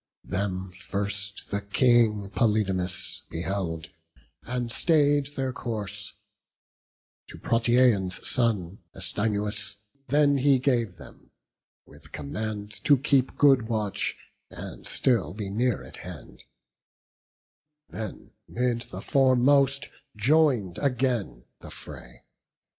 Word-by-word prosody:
Them 95 -1 -3
first 100 +2 -5
the 100 0 -1
King 105 -1 +3
Polydamas 95 -5 0
beheld, 85 -1 -3 0.5
And 125 -1 -3
stay'd 145 +1 +2
their 130 -1 -1
course; 105 -4 -5 1.1
to - - -10
Protiaon's 115 -5 +2
son, 105 -7 0 0.2
Astynous, 105 0 -2 0.3
then 145 +1 +4
he 140 0 +5
gave 120 -8 0
them, 70 - -14 0.6
with - - -17
command 105 +7 -5
To 145 - +6
keep 135 -1 +1
good 135 -6 +5
watch, 110 -3 -1 0.3
and - - -9
still 100 - +1
be 105 -2 -4
near 120 +2 0
at - - -11
hand; - - -10 1.4
Then 110 -2 -7 0.2
'mid 120 -1 -1
the - - -6
foremost 135 0 +3 0.3
join'd 125 - +3
again 125 - 0 0.2
the - - -11
fray. - - -11
110 Hz, 100 wpm, -27 LUFS, 100-130 Hz, 1.4 s, To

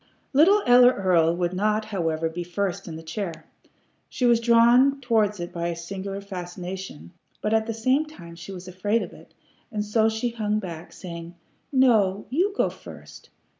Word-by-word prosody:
Little 385 +9 +5
Ella 245 0 +7
Earl 170 -5 +2
would 175 0 -1
not, 215 +3 0
however, 165 -6 -1
be 170 +2 -5
first 180 +1 -3
in 165 - -6
the 160 - -9
chair. 165 -1 -5 0.6
She 250 - -1
was 235 -1 +5
drawn 240 +4 +5
towards 215 -5 +1
it 175 0 -6
by 170 0 -2
a 170 - -2
singular 195 +3 -6
fascination, 180 - -7 0.3
but 215 - -1
at 220 0 +2
the 225 - -2
same 260 +7 +1
time 170 - -12
she 170 +3 -10
was 185 -1 -9
afraid 205 +5 0
of - - -9
it, - - -17 0.4
and 210 -2 -2
so 220 +1 +2
she 220 +2 -2
hung 215 -2 -1
back, 170 -5 -7
saying: 170 -2 -9 0.4
"No! 220 -8 +3
You 360 +9 +2
go - - +2
first! - - -13
200 Hz, 175 wpm, -25 LUFS, 175-230 Hz, 0.6 s, Ella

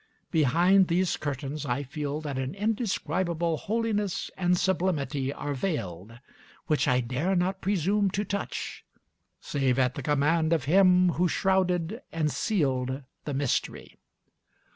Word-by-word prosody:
Behind 175 +5 +4
these 180 +1 +1
curtains 145 0 -4
I 135 0 -1
feel 145 +2 -4
that 140 -4 -4
an 130 +6 -3
indescribable 185 -6 -1
holiness 210 -1 -1
and 180 -1 +2
sublimity 150 -8 0
are 145 0 -4
veiled, 115 - -4 0.5
which 155 - +1
I 125 0 +3
dare 130 +11 -1
not 185 +2 0
presume 200 +2 +1
to 205 - 0
touch, 200 +2 -4 0.6
save 135 -3 0
at 130 -1 +2
the 145 - -5
command 150 +4 +2
of 160 - +1
Him 180 +3 +5
who 180 - +4
shrouded 190 +2 +1
and 155 -2 0
sealed 135 - -1 0.2
the 145 - -3
mystery. 140 -2 -2
160 Hz, 130 wpm, -27 LUFS, 140-190 Hz, 0.6 s, Him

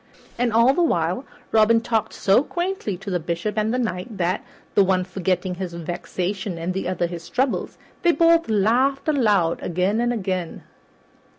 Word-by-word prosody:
And 245 -1 +2
all 230 +4 +5
the 350 - +1
while 180 - 0 0.3
Robin 225 +1 +5
talked 225 -1 -1
so 195 +5 +3
quaintly 345 - -3
to 195 +2 -7
the 180 - 0
Bishop 170 +6 -3
and 215 0 +1
the 250 - 0
Knight 215 -2 -3
that, 180 +1 0 0.3
the 200 - +5
one 185 -1 +2
forgetting 185 0 -1
his 180 -1 -5
vexation 175 +2 -4
and 170 +2 -3
the 190 - -3
other 180 -1 0
his 170 -1 -7
troubles, 260 0 -1 0.2
they 345 - +4
both 335 -3 +3
laughed 240 +8 +2
aloud 210 - +2
again 185 +6 0
and 240 0 +1
again. 185 -6 -3
200 Hz, 170 wpm, -23 LUFS, 180-240 Hz, 0.3 s, all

